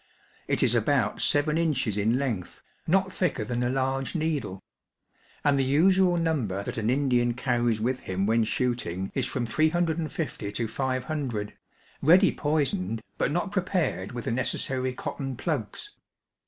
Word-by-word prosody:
It - - +2
is - - +4
about 120 -1 +1
seven 150 +2 +2
inches 135 -10 0
in 110 +4 +2
length, 120 -10 -3 0.2
not 190 +2 +2
thicker 175 - 0
than 120 +2 -2
a 120 - +1
large 135 +3 -1
needle; 150 - -2 0.8
and 140 -1 +3
the - - +3
usual 175 +6 +4
number 130 - -1
that 110 - -4
an 110 +1 0
Indian 125 -3 +2
carries 120 -3 +1
with 125 +4 0
him 95 +1 -2
when 115 +2 +3
shooting 110 -6 -2
is 130 -2 0
from 125 -3 -2
350 160 -4 -1
to 115 +1 -1
500, 130 -3 -2 0.5
ready 180 +6 +6
poisoned, 130 - -1 0.2
but - - +2
not 175 +5 -1
prepared 180 - -1
with 120 -1 -6
the - - -1
necessary 130 +1 -1
cotton 135 +1 -5
plugs. 135 - -3
130 Hz, 145 wpm, -27 LUFS, 115-155 Hz, 0.8 s, ready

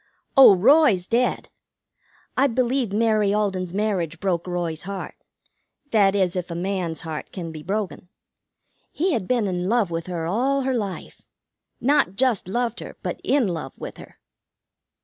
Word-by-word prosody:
"Oh, 265 -8 +9
Roy's 225 - +4
dead. 240 +5 0 0.9
I 275 +2 +4
believe 250 -2 0
Mary 215 -1 +2
Alden's 190 -4 -1
marriage 185 -5 -1
broke 180 -3 -1
Roy's 175 -3 -3
heart; 195 +1 -6 0.8
that 205 -3 +4
is, 185 -3 +1
if 180 0 -3
a 170 - -5
man's 180 -2 -2
heart 160 -3 -6
can 170 -4 -6
be 155 -1 -8
broken. 195 0 -4 0.8
He 355 +3 0
had 210 -8 -2
been 245 -4 +1
in 180 -1 -2
love 225 -6 +2
with 165 +1 -3
her 170 -3 -3
all 260 +10 +1
her 265 0 0
life. 205 -6 -5 0.6
Not 275 -8 +2
just 245 -6 +1
loved 235 +3 -2
her, - - -9
but - - -4
in 275 -6 +2
love 160 -7 -4
with - - -8
her. - - -13
195 Hz, 155 wpm, -23 LUFS, 175-240 Hz, 0.9 s, Oh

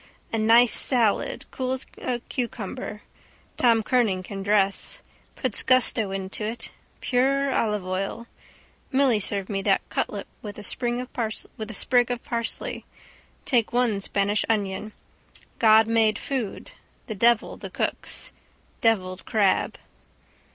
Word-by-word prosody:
A 225 - +1
nice 230 +2 +6
salad, 235 -6 +2
cool 255 0 -2
as 260 - -4
a 245 -2 -2
cucumber, 235 -3 -5 0.5
Tom 230 -3 +3
Kernan 210 -7 +1
can 195 +1 -6
dress. 200 -1 0 0.3
Puts - - +1
gusto 250 -4 +3
into 195 +2 -4
it. 225 +2 -4 0.3
Pure 270 +2 +1
olive 210 -5 0
oil. 195 +5 -3 0.7
Milly 265 -5 +3
served 195 -1 -3
me 195 -2 -2
that - - +1
cutlet - - -2 0.2
with 205 -2 -8
a 210 - -8
sprig 240 0 0
of 235 - -15
parsley. 235 -1 -3 0.6
Take 235 -4 +2
one 235 -5 +1
Spanish 200 +1 +1
onion. 205 -1 -1 0.7
God 220 -1 +6
made 225 -2 +2
food, 255 -7 -4 0.3
the 220 - -5
devil 230 +2 +3
the - - -8
cooks. - - -3 0.5
Devilled 185 -5 +1
crab. 205 -3 +2
220 Hz, 120 wpm, -25 LUFS, 205-245 Hz, 0.7 s, nice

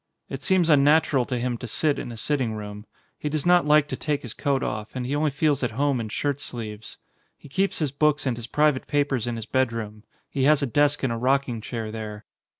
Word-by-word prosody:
It 135 0 -5
seems 180 +2 +2
unnatural 145 -3 +4
to 125 -1 -2
him 120 -1 -2
to 125 - -6
sit 145 +6 +1
in 120 - -5
a 115 - -8
sitting 130 -2 -1
room; 105 0 -8 0.3
he 150 - -2
does 150 -1 -2
not 175 -3 +4
like 150 -1 +5
to - - -2
take 150 -2 -2
his 120 - -6
coat 140 -2 0
off, 105 +2 -4
and 125 -1 -3
he 135 +3 -1
only 150 +1 +2
feels 145 0 +1
at 125 - 0
home 140 -2 +2
in 110 -2 -4
shirt 145 +5 -2
sleeves. 110 -4 -7 0.4
He - - -14
keeps 190 +8 0
his 150 -4 0
books 150 +1 +1
and 130 -3 0
his 115 0 -7
private 150 0 +2
papers 140 -5 0
in 120 - -2
his 115 -2 -5
bedroom; 115 -4 -2 0.2
he 135 -1 -1
has 150 0 +4
a - - +3
desk 145 +3 +2
and 130 -3 +1
a - - -3
rocking 130 -1 +1
chair 115 -1 -5
there. 110 -1 -7
135 Hz, 235 wpm, -25 LUFS, 115-145 Hz, 0.4 s, like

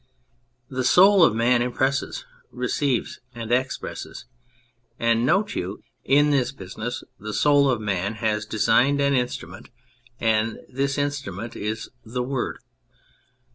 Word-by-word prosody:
The 130 0 -3
soul 190 +7 +6
of 110 - +4
man 120 +2 +3
impresses, 130 - -1 0.3
receives 140 -5 -1 0.2
and 115 -1 -6
expresses. 130 +1 -3 0.7
And, 115 +1 +2
note 205 +7 +2
you, 95 +4 -4 0.2
in 145 +2 +4
this 135 -3 +1
business 110 +1 -6 0.2
the 105 0 -5
soul 145 -1 +4
of 125 -4 +1
man 100 0 -2
has 105 -1 -1
designed 115 +6 +3
an 140 0 +2
instrument, 120 -8 -3 0.5
and 110 0 +1
this 135 +2 -2
instrument 135 -7 -3
is 110 +2 -4
the 125 +2 -3
Word. 130 0 -3
125 Hz, 125 wpm, -24 LUFS, 110-140 Hz, 0.7 s, soul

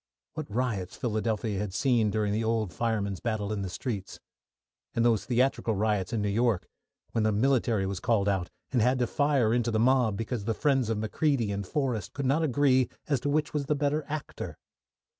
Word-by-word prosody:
What 155 -5 -5
riots 105 -5 -2
Philadelphia 110 -2 -1
had 100 -2 -3
seen 120 -5 +3
during 105 -1 0
the 110 +2 0
old 110 -5 0
firemen's 105 -5 -1
battle 110 -3 -2
in 105 - -2
the 95 - -3
streets! 100 0 -5 0.8
And 115 - +2
those 115 -3 +3
theatrical 125 -2 +1
riots 105 -1 0
in 110 -3 -1
New 105 - 0
York, 115 -2 +1 0.4
when 115 - 0
the 110 - +3
military 115 -2 +2
was 95 -1 -3
called 110 -5 +1
out, 95 -3 0 0.2
and 125 -4 +2
had 125 +3 +3
to 125 - +2
fire 135 -3 +2
into 120 -1 +1
the 110 - +1
mob, 120 -3 +3
because 115 -1 -3
the 115 0 0
friends 135 -4 +2
of 115 - 0
Macready 115 +1 0
and 100 -1 -3
Forrest 125 -8 -2
could 140 -1 -3
not 140 +5 +2
agree 130 -3 +3 0.2
as 140 -4 +1
to 145 - -2
which 150 +1 0
was 145 -2 -1
the 150 - +2
better 145 +1 0
actor! 155 0 -5
115 Hz, 195 wpm, -28 LUFS, 105-130 Hz, 0.8 s, seen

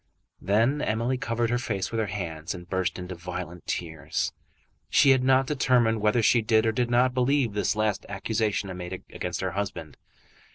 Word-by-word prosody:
Then 115 +9 +2
Emily 120 +4 0
covered 115 0 -1
her 120 - +1
face 100 -7 -2
with 115 - -1
her 110 - 0
hands 85 -4 -4
and 90 -1 -10
burst 95 -1 -1
into 90 0 -6
violent 90 0 -7
tears. 80 -5 -3 0.6
She 140 - +6
had 130 -1 +3
not 130 0 +4
determined 125 -6 +2
whether 110 +2 +2
she 115 +2 +4
did 110 0 +3
or 110 - +3
did 120 +2 0
not 125 +1 +3
believe 130 -2 +2
this 105 +2 0
last 105 -2 -1
accusation 100 -1 -1
made 90 -1 -6 0.2
against 90 -1 -4
her 95 -1 -1
husband. 95 -6 -4
110 Hz, 175 wpm, -26 LUFS, 90-120 Hz, 0.6 s, She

